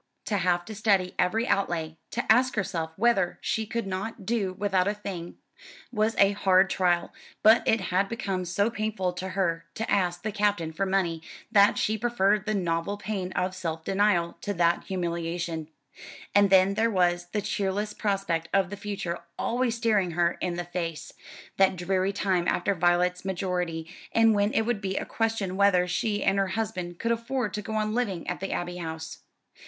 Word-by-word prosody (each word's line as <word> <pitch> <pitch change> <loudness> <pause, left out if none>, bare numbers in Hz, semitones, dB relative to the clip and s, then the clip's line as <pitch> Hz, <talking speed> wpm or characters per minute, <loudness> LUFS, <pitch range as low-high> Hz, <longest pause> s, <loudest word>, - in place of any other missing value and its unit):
To 205 - 0
have 175 -1 +1
to 220 - -7
study 200 -4 +1
every 225 +6 +1
outlay, 165 -5 0
to 240 - -3
ask 250 +3 +4
herself 170 -6 -2
whether 200 -4 +2
she 220 -1 -2
could 230 0 -2
not 195 +2 -5
do 210 -4 0
without 190 -1 +1
a 205 - 0
thing, 185 -5 -6 0.6
was 220 -1 +1
a 200 0 +5
hard 190 -2 +3
trial; 175 -2 +1 0.3
but 220 +2 +7
it 225 - +4
had 195 +2 +2
become 195 -5 -2
so 200 +6 +1
painful 215 -5 -2
to 185 +1 -5
her 165 -3 0
to 225 - -3
ask 175 -3 +1
the 215 - -2
Captain 205 -6 0
for 195 +4 -1
money 180 -4 0 0.3
that 205 -2 +5
she 215 0 0
preferred 210 -3 +1
the 215 - +1
novel 175 +1 -1
pain 195 -3 -4
of 185 +1 -1
self 165 -3 -4
denial 190 -3 +1
to 205 - -3
that 170 0 +2
humiliation. 170 -3 -3 0.7
And 205 0 +5
then 190 0 +5
there 220 +3 +2
was 175 -3 +1
the 210 - 0
cheerless 205 0 -2
prospect 195 -6 -1
of 195 -1 +2
the 205 - -5
future 195 -4 -4 0.2
always 240 0 0
staring 215 -6 +2
her 170 -1 +3
in 175 -1 -1
the 175 0 -4
face, 170 -2 -5 0.4
that 190 -1 +4
dreary 185 +2 0
time 190 -3 0
after 200 +3 +1
Violet's 180 +1 +2
majority, 180 -3 -2 0.3
when 220 -2 +4
it 225 - +2
would 225 -2 -1
be 190 -1 -2
a - - -2
question 220 -5 -1
whether 190 -2 +4
she 205 +3 -1
and 195 +1 +2
her 195 - +2
husband 185 -6 -3
could 230 - -1
afford 235 0 -1
to 210 - -3
go 220 +2 -5
on 215 0 0
living 210 -8 -2
at - - -3
the 195 - -4
Abbey 175 0 -3
House. 160 -1 -6
195 Hz, 180 wpm, -27 LUFS, 175-210 Hz, 0.7 s, but